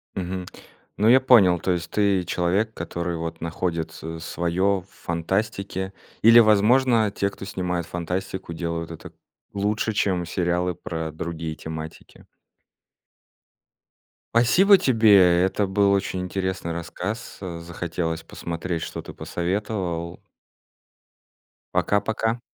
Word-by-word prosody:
Мгм. 90 Hz, 0 st, -4 dB, 0.5 s
Ну 105 Hz, -, +2 dB
я 130 Hz, +2 st, +8 dB
понял, 105 Hz, -10 st, +6 dB
то 90 Hz, -, 0 dB
есть 85 Hz, -1 st, -2 dB
ты 100 Hz, -3 st, +2 dB
человек 95 Hz, +6 st, 0 dB
который 85 Hz, -3 st, -4 dB
вот 80 Hz, 0 st, -5 dB
находит 85 Hz, 0 st, -2 dB
с 80 Hz, -1 st, -7 dB
своё 90 Hz, +4 st, 0 dB
в 95 Hz, -, -24 dB
фантастике 95 Hz, +2 st, -3 dB, 0.3 s
или 115 Hz, +2 st, +9 dB
возможно, 110 Hz, +1 st, +4 dB
те 100 Hz, 0 st, 0 dB
кто 100 Hz, -, -10 dB
снимают 90 Hz, -3 st, -2 dB
фантастику 90 Hz, +1 st, -4 dB
делают 85 Hz, 0 st, -4 dB
это 80 Hz, -, -10 dB, 0.4 s
лучше 105 Hz, +2 st, 0 dB
чем 95 Hz, -4 st, 0 dB
сериалы 90 Hz, +1 st, 0 dB
про 80 Hz, -2 st, -5 dB
другие 80 Hz, 0 st, -5 dB
тематики. 80 Hz, 0 st, -9 dB, 2.1 s
Спасибо 185 Hz, -, +6 dB
тебе, 100 Hz, -, +5 dB
это 100 Hz, +1 st, 0 dB
был 100 Hz, +1 st, +3 dB
очень 95 Hz, -1 st, -1 dB
интересный 95 Hz, -2 st, -3 dB
рассказ. 90 Hz, +6 st, -5 dB
Захотелось 85 Hz, -2 st, -4 dB
посмотреть, 85 Hz, 0 st, -4 dB
что -, -, -5 dB
ты -, -, -10 dB
посоветовал. 90 Hz, -2 st, -3 dB, 1.6 s
Пока-пока! 110 Hz, +3 st, +1 dB
90 Hz, 110 wpm, -24 LUFS, 85-100 Hz, 2.1 s, или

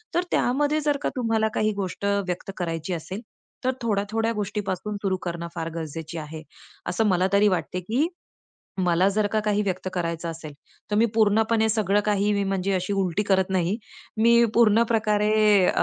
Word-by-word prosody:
तर 350 Hz, -, +2 dB
त्यामध्ये 290 Hz, +4 st, +1 dB
जर 295 Hz, -1 st, +1 dB
का -, -, 0 dB
तुम्हाला 225 Hz, -3 st, +1 dB
काही 215 Hz, 0 st, +2 dB
गोष्ट 195 Hz, 0 st, -4 dB
व्यक्त 195 Hz, -2 st, -1 dB
करायची 165 Hz, 0 st, -3 dB
असेल, 185 Hz, +5 st, -5 dB, 0.4 s
तर 255 Hz, -, +2 dB
थोड्या 210 Hz, -4 st, 0 dB
थोड्या 225 Hz, +1 st, 0 dB
गोष्टीपासून 210 Hz, -1 st, -3 dB
सुरू 190 Hz, -2 st, 0 dB
करणं 170 Hz, -1 st, -4 dB
फार 165 Hz, -1 st, -3 dB
गरजेची 160 Hz, 0 st, -6 dB
आहे, 155 Hz, 0 st, -7 dB, 0.5 s
असं 200 Hz, +5 st, +1 dB
मला 185 Hz, -1 st, +2 dB
तरी 200 Hz, +1 st, +5 dB
वाटते. 180 Hz, -1 st, -1 dB
की 230 Hz, -, 0 dB, 0.7 s
मला 180 Hz, +1 st, +3 dB
जर 215 Hz, 0 st, +2 dB
का 215 Hz, -, +2 dB
काही 210 Hz, 0 st, +1 dB
व्यक्त 185 Hz, -2 st, -2 dB
करायचं 170 Hz, -1 st, -3 dB
असेल, 160 Hz, -2 st, -8 dB, 0.4 s
तर 210 Hz, -, +1 dB
मी 225 Hz, +2 st, +5 dB
पूर्णपणे 220 Hz, +1 st, +3 dB
सगळं 205 Hz, -2 st, +2 dB
काही 205 Hz, 0 st, +1 dB
मी 200 Hz, -1 st, 0 dB
म्हणजे 195 Hz, 0 st, -1 dB
अशी 185 Hz, +2 st, -1 dB
उलटी 195 Hz, -1 st, 0 dB
करत 190 Hz, -2 st, +1 dB
नाही. 185 Hz, +1 st, +1 dB, 0.4 s
मी 235 Hz, +2 st, +5 dB
पूर्ण 225 Hz, -1 st, +5 dB
प्रकारे 215 Hz, -2 st, +2 dB, 0.3 s
अ, -, -, +2 dB
200 Hz, 175 wpm, -25 LUFS, 180-220 Hz, 0.7 s, तरी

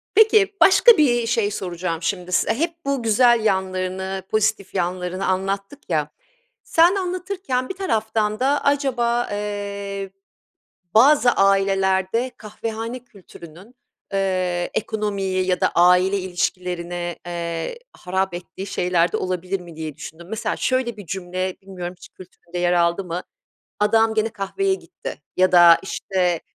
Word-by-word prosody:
Peki, 430 Hz, -2 st, +5 dB
başka 450 Hz, +3 st, +7 dB
bir 240 Hz, -6 st, +3 dB
şey 225 Hz, -3 st, +1 dB
soracağım 175 Hz, -3 st, -4 dB
şimdi 180 Hz, 0 st, -3 dB
size. -, -, +2 dB
Hep 330 Hz, +7 st, -1 dB
bu 275 Hz, -3 st, -1 dB
güzel 230 Hz, 0 st, +4 dB
yanlarını 190 Hz, -1 st, -1 dB
pozitif 215 Hz, -2 st, 0 dB
yanlarını 180 Hz, +1 st, -2 dB
anlattık 195 Hz, +8 st, -3 dB
ya. 150 Hz, -3 st, 0 dB, 0.5 s
Sen 340 Hz, +4 st, +4 dB
anlatırken 365 Hz, -8 st, -3 dB
bir -, -, -4 dB
taraftan 220 Hz, -, -1 dB
da 275 Hz, +3 st, +1 dB
acaba, 245 Hz, -4 st, +1 dB
eee, 200 Hz, -1 st, -4 dB, 0.9 s
bazı 250 Hz, +2 st, +6 dB
ailelerde 195 Hz, +3 st, +2 dB
kahvehane 225 Hz, +2 st, -5 dB
kültürünün, 195 Hz, -1 st, -15 dB, 0.4 s
eee, 185 Hz, -2 st, -1 dB
ekonomiyi 195 Hz, -4 st, -1 dB
ya 180 Hz, -1 st, 0 dB
da -, -, +3 dB
aile 180 Hz, +3 st, +4 dB
ilişkilerini, 175 Hz, -1 st, -3 dB
eee, 170 Hz, -, -4 dB
harap 190 Hz, 0 st, -2 dB
ettiği 180 Hz, +2 st, -7 dB
şeyler 180 Hz, -3 st, +1 dB
de -, -, +1 dB
olabilir 185 Hz, +1 st, -3 dB
mi 170 Hz, -2 st, -12 dB
diye 155 Hz, -3 st, -6 dB
düşündüm. 165 Hz, +2 st, -10 dB
Mesela 220 Hz, 0 st, -2 dB
şöyle 255 Hz, -3 st, 0 dB
bir 205 Hz, -3 st, -10 dB
cümle 185 Hz, 0 st, -3 dB
bilmiyorum 180 Hz, -2 st, -7 dB
hiç -, -, -14 dB
kültüründe 180 Hz, -1 st, -11 dB
yer 175 Hz, 0 st, +2 dB
aldı 170 Hz, +2 st, +2 dB
mı: 175 Hz, 0 st, -4 dB, 0.6 s
"Adam 220 Hz, +1 st, +3 dB
gene 220 Hz, 0 st, +1 dB
kahveye 235 Hz, -, -1 dB
gitti." -, -, -9 dB
ya 185 Hz, 0 st, +3 dB
da 175 Hz, -1 st, +8 dB
işte, 180 Hz, -3 st, -1 dB
195 Hz, 130 wpm, -22 LUFS, 180-230 Hz, 0.9 s, da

